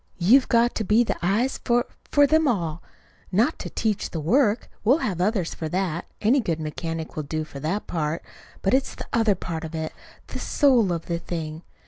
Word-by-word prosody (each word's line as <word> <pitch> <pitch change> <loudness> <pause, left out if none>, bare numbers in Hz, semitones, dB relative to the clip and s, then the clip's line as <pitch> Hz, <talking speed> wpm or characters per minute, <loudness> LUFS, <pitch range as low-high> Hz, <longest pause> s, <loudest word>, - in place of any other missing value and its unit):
You've 235 +10 +5
got 235 +1 +4
to 220 - -2
be 215 +4 +4
the - - -1
eyes 210 +9 +1
for 240 0 +1 0.2
for 290 0 +5
them 315 +2 +3
all; 170 - -1 0.5
not 230 - +2
to - - -5
teach 215 -3 -1
the 165 - -4
work 220 - +2 0.2
we'll 250 +7 +5
have 180 -4 -2
others 190 -3 0
for 160 - -5
that. 180 -1 -1
Any 235 +6 +3
good 170 -9 -1
mechanic 160 +1 -4
will 155 - -2
do 155 +2 -3
for 145 -2 -9
that 165 +9 -2
part. 155 -1 -2 0.4
But 195 - +2
it's 265 +1 +1
the - - -7
other 225 -4 +3
part 165 -2 -5
of 160 0 -6
it 160 0 -3 0.3
the - - -7
soul 250 - +3
of 165 -1 -3
the 170 -1 -2
thing. 160 -2 -5
190 Hz, 200 wpm, -24 LUFS, 165-235 Hz, 0.5 s, You've